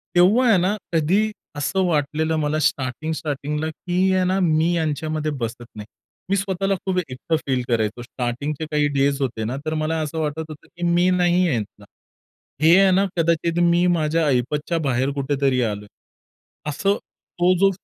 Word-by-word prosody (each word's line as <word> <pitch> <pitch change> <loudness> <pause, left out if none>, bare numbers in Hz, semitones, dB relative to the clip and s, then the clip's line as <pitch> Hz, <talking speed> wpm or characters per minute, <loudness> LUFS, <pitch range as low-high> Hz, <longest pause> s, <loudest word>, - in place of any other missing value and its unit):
तेव्हा 210 +9 +5
आहे 200 - +6
ना 185 +4 +1 0.2
कधी 190 +7 +2 0.2
असं 190 +7 0
वाटलेलं 155 0 0
मला 150 +1 0
स्टार्टिंग 140 +2 -1
स्टार्टिंगला 150 0 -3
की 185 +4 0
आहे 185 0 +2
ना 190 +1 +1
मी 165 -1 +2
यांच्यामध्ये 155 -1 -1
बसत 120 +1 -4
नाही. 105 -1 -7 0.4
मी 200 - +2
स्वतःला 195 0 0
खूप 190 -1 -1
एकटं 130 +6 -2
फील 130 -2 +1
करायचो. 115 0 0
स्टार्टिंगचे 135 +5 -4
काही 150 -1 +2
डेज 140 0 +2
होते 115 -4 -2
ना 125 +5 -3
तर 155 - -1
मला 160 +1 -1
असं 155 +1 -3
वाटत 150 0 -2
होतं 150 - -11
की 175 - -10
मी 175 +1 +3
नाहीये 180 -1 +2
ह्यातला. 105 -2 -5 0.8
हे 165 +4 +6
आहे 195 -1 +5
ना 195 +2 +3
कदाचित 170 +1 +1
मी 175 +1 +3
माझ्या 160 +1 +1
ऐपतच्या 145 +6 0
बाहेर 130 +1 +1
कुठेतरी 135 -2 0
आलोय. 105 -3 -2 0.8
असं 195 +7 +1
तो 180 0 -2
जो 195 - +5
155 Hz, 165 wpm, -22 LUFS, 140-175 Hz, 0.8 s, आहे